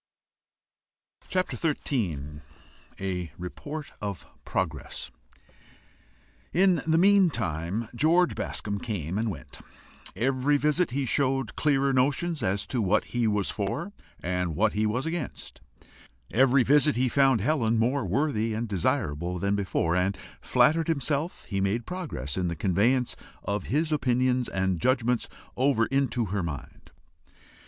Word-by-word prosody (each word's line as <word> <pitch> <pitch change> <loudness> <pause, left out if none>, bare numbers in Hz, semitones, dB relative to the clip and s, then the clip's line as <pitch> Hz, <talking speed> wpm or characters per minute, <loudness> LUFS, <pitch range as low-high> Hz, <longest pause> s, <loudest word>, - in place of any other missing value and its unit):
CHAPTER 185 0 0
XIII. 85 - -2 0.6
A 90 -3 -3
REPORT 145 - -6
OF 100 -2 -4 0.2
PROGRESS. 80 -7 -3 1.4
In 185 0 +3
the 160 0 +4
meantime 115 - +2
George 165 +7 +3
Bascombe 100 -1 -3
came 95 -5 -3
and 115 0 0
went; 100 - -8 0.6
every 135 +4 +2
visit 150 +4 +2
he 135 +2 -1
showed 135 -2 0
clearer 140 -2 +2
notions 145 +5 +1
as 100 -1 0
to 125 - -1
what 100 -2 +2
he 120 -2 +2
was 105 -2 +1
for, 105 - -3 0.3
and 90 -2 -1
what 105 +5 +2
he 105 +1 +1
was 125 +6 -1
against; 165 -4 -5 0.7
every 130 +2 +5
visit 145 +3 +4
he 130 +2 +2
found 135 -1 +4
Helen 115 -1 +1
more 125 +5 +1
worthy 110 - 0
and 115 +2 -2
desirable 90 - -1
than 100 +3 0
theretofore, 90 -4 0
and 95 +2 +1 0.2
flattered 160 +1 +3
himself 155 +1 -1
he 95 -2 -2
made 100 +5 0
progress 145 - -4
in 90 -1 0
the 85 - -2
conveyance 105 - +1 0.3
of 100 0 -2
his 155 +3 0
opinions 125 -3 +1
and 95 -3 -1
judgments 125 0 +1 0.3
over 130 -3 +3
into 130 -3 0
her 100 - 0
mind. 80 -5 -7
120 Hz, 130 wpm, -27 LUFS, 95-140 Hz, 1.4 s, every